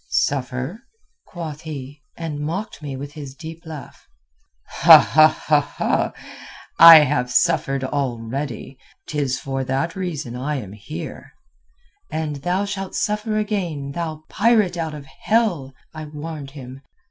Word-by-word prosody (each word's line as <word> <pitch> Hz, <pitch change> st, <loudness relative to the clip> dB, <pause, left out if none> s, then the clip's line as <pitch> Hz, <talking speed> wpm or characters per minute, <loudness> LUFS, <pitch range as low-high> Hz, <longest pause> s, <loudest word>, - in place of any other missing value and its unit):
"'Suffer?' 135 Hz, -, -1 dB, 0.5 s
quoth 160 Hz, -4 st, -7 dB
he, 145 Hz, -2 st, -8 dB, 0.2 s
and 160 Hz, -3 st, -4 dB
mocked 170 Hz, +7 st, -4 dB
me 145 Hz, -3 st, -5 dB
with 140 Hz, +2 st, -7 dB
his 145 Hz, -3 st, -9 dB
deep 160 Hz, +3 st, -9 dB
laugh. 150 Hz, -5 st, -10 dB, 0.8 s
'I 155 Hz, -1 st, +5 dB, 0.8 s
have 150 Hz, -6 st, +8 dB
suffered 140 Hz, -5 st, +2 dB
already. 130 Hz, 0 st, -4 dB, 0.3 s
'Tis 140 Hz, -4 st, -1 dB
for 135 Hz, -1 st, -3 dB
that 135 Hz, +6 st, -2 dB
reason 155 Hz, -10 st, -4 dB
I 140 Hz, +4 st, -2 dB
am 105 Hz, -9 st, -6 dB
here.' 105 Hz, +9 st, -8 dB, 0.8 s
"'And 155 Hz, -2 st, -3 dB
thou 180 Hz, +7 st, -1 dB
shalt 195 Hz, -1 st, -5 dB
suffer 215 Hz, 0 st, -1 dB
again, 180 Hz, -10 st, -2 dB
thou 155 Hz, 0 st, -5 dB
pirate 210 Hz, -4 st, +2 dB
out 160 Hz, -2 st, -3 dB
of 145 Hz, -2 st, -9 dB
hell!' 170 Hz, -, 0 dB, 0.2 s
I 155 Hz, -1 st, -7 dB
warned 150 Hz, -1 st, -7 dB
him. 130 Hz, 0 st, -9 dB
150 Hz, 120 wpm, -21 LUFS, 135-170 Hz, 0.8 s, have